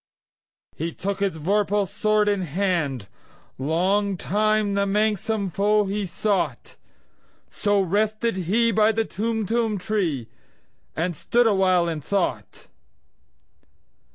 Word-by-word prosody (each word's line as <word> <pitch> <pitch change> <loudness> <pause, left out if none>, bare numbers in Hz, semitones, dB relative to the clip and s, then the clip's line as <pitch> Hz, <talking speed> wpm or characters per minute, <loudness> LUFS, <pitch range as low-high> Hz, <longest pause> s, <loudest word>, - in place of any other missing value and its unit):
He 165 +1 -4
took 200 +1 -3
his 195 -4 -1
vorpal 200 +4 +1
sword 215 +1 +1
in 205 -2 +1
hand:Long 175 - -2
time 215 +2 +1
the 200 0 +1
manxome 210 -1 0
foe 210 +3 +2
he 200 0 -2
sought—So 205 +1 -3
rested 215 +4 0
he 210 +6 +1
by 220 0 +3
the 225 0 0
Tumtum 225 0 -1
tree, 180 - -2 0.7
And 170 +2 -1
stood 240 +10 +2
awhile 190 -5 +3
in 160 -2 -3
thought. 195 +5 -3
200 Hz, 100 wpm, -24 LUFS, 180-215 Hz, 0.7 s, by